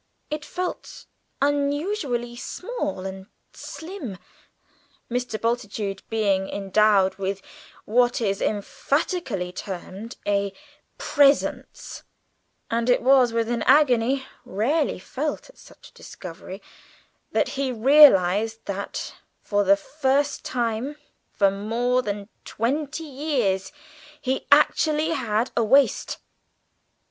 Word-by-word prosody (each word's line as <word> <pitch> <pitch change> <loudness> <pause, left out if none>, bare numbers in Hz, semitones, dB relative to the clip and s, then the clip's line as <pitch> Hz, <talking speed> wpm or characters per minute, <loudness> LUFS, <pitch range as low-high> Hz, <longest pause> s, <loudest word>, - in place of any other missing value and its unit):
It 300 0 -3
felt 360 +3 -5 0.4
unusually 285 - -1
small 240 - -4
and 190 0 -7 0.3
slim, 320 - -7 0.9
Mr. 245 -3 -2
Bultitude 210 -4 -2
being 200 -4 +1
endowed 200 -1 +2
with 195 0 -2 0.5
what 245 +3 +2
is 200 -4 -1
euphemistically 215 - -1
termed 195 +5 -7
a 200 -1 +1 0.4
"presence," 285 -1 +1 0.7
and 230 +1 0
it 245 - +3
was 260 -2 +5
with 230 -1 0
an 235 -1 -1
agony 265 -1 +3 0.2
rarely 275 +10 0
felt 295 - -4
at - - -25
such - - -16
a - - -30
discovery 185 +2 -10 0.7
that - - +1
he 270 -1 -2
realised 225 -5 +5
that, 200 0 -5 0.3
for 205 -1 +1
the 200 0 +5
first 280 +4 0
time 240 +3 -2 0.4
for 200 -1 +3
more 235 +5 0
than 205 -3 -4 0.2
twenty 285 +7 -2
years, 260 -10 -1 0.5
he 260 0 -2
actually 310 0 +4
had 235 -5 0
a 235 - +2
waist. 270 +5 +3
235 Hz, 105 wpm, -24 LUFS, 200-280 Hz, 0.9 s, was